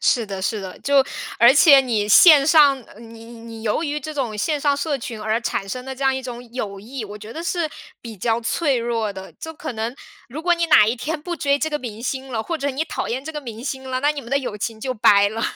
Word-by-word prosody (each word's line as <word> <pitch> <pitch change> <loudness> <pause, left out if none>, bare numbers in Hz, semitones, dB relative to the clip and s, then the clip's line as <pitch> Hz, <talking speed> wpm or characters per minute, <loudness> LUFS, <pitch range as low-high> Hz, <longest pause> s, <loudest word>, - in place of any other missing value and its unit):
是 235 -3 +2
的 195 -2 -5
是 210 +2 -1
的， 190 -1 -8
就 280 -1 +3 0.3
而 235 +2 +7
且 280 -1 +7
你 225 -5 -1
线 285 - +8
上， 295 -4 +6
呃， 210 - -16
你 230 -1 -12
你 230 -1 -11
由 220 +7 0
于 295 -2 -2
这 310 +1 -7
种 250 -7 -3
线 295 +8 -1
上 285 -1 +2
社 285 0 -2
群 230 -2 -7
而 220 +2 -1
产 200 -4 -3
生 250 +4 -5
的 265 0 -6
这 265 - -8
样 265 0 +3
一 265 - -3
种 245 -1 -7
友 205 -6 -5
谊， 230 +4 -7
我 205 0 -9
觉 210 +2 -10
得 325 - -6
是 340 -2 -1 0.3
比 230 -2 -9
较 225 +4 0
脆 275 +4 0
弱 230 -3 -2
的。 190 0 -10
就 320 - -8
可 300 - -6
能 225 +2 -4 0.3
如 290 +6 -7
果 350 +1 +3
你 340 0 -1
哪 215 -10 +6
一 225 - +1
天 300 +6 -4
不 345 +3 -4
追 280 -3 +1
这 315 +2 -2
个 295 - -1
明 230 -4 -8
星 265 +1 -4
了， 220 -2 -2
或 335 +7 -3
者 285 0 -2
你 280 +4 -2
讨 315 - -4
厌 260 +3 -3
这 320 - -6
个 300 - -5
明 235 -3 -9
星 265 -1 -5
了， 255 0 -2
那 290 - +2
你 300 -1 -4
们 235 -1 -12
的 275 - +2
友 250 -6 -5
情 220 +2 -4
就 255 - -2
掰 205 -3 +4
了。 225 +2 -5
255 Hz, 290 characters per minute, -21 LUFS, 225-285 Hz, 0.3 s, 线